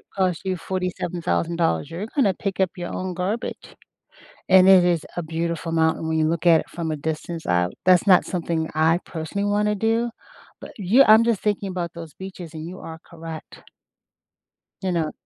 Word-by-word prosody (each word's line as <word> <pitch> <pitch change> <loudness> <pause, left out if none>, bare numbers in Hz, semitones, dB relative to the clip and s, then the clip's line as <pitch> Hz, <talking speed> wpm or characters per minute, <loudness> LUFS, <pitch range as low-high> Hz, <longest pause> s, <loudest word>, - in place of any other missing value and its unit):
cost 185 -3 0
you 185 -1 0
$47,000, 170 - -1
you're 190 +6 -5
gonna 230 -10 +3
pick 195 0 -4
up 190 -2 +3
your 175 - -5
own 185 -1 -3
garbage. 190 +6 -4 0.7
And 190 0 +7
it 185 -2 +8
is 170 -3 +1
a 175 - -1
beautiful 165 +1 -3
mountain 160 0 +1
when 160 0 0
you 155 0 +2
look 170 +1 -2
at 165 -2 +6
it - - -14
from 165 -1 -4
a - - -1
distance 160 +2 -5
out. 90 0 +1
That's 185 +1 +5
not 185 -2 +6
something 165 -3 -2
I 160 +2 +3
personally 190 +5 -3
wanna 210 0 +1
do, 225 +3 0 0.5
but - - -9
you 215 +8 +5
I'm 220 0 +7
just 230 -4 +1
thinking 205 -2 -1
about 175 -2 -3
those 165 -2 -9
beaches, 185 -3 -9
and 160 +1 -7
you 185 +2 -8
are 160 0 -9
correct. 165 -1 -10 1.2
You 185 -1 -1
know, 165 -3 -1
175 Hz, 180 wpm, -23 LUFS, 160-190 Hz, 1.2 s, it